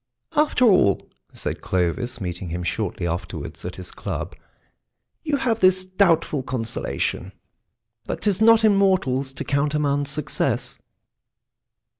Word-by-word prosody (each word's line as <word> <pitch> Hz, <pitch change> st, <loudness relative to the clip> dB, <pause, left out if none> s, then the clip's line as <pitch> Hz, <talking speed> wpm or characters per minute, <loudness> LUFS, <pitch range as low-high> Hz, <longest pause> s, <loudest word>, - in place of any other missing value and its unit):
"After 295 Hz, -4 st, +3 dB
all," 180 Hz, -, +4 dB, 0.2 s
said -, -, -5 dB
Clovis, 95 Hz, +8 st, -1 dB
meeting 90 Hz, -2 st, -4 dB
him 90 Hz, +2 st, -3 dB
shortly 95 Hz, -1 st, -2 dB
afterwards 85 Hz, +1 st, -5 dB
at -, -, -5 dB
his -, -, -8 dB
club, -, -, -5 dB, 0.9 s
"you 300 Hz, -3 st, 0 dB
have 235 Hz, -4 st, 0 dB
this 185 Hz, -1 st, +4 dB
doubtful 170 Hz, -6 st, +2 dB
consolation, 125 Hz, -3 st, -3 dB, 0.7 s
that -, -, -4 dB
'tis 205 Hz, -1 st, +1 dB
not 225 Hz, 0 st, +6 dB
in 210 Hz, -2 st, +5 dB
mortals 170 Hz, -10 st, +2 dB
to 135 Hz, -, -5 dB
countermand 145 Hz, 0 st, 0 dB
success." 135 Hz, -4 st, -1 dB
145 Hz, 120 wpm, -23 LUFS, 120-190 Hz, 0.9 s, not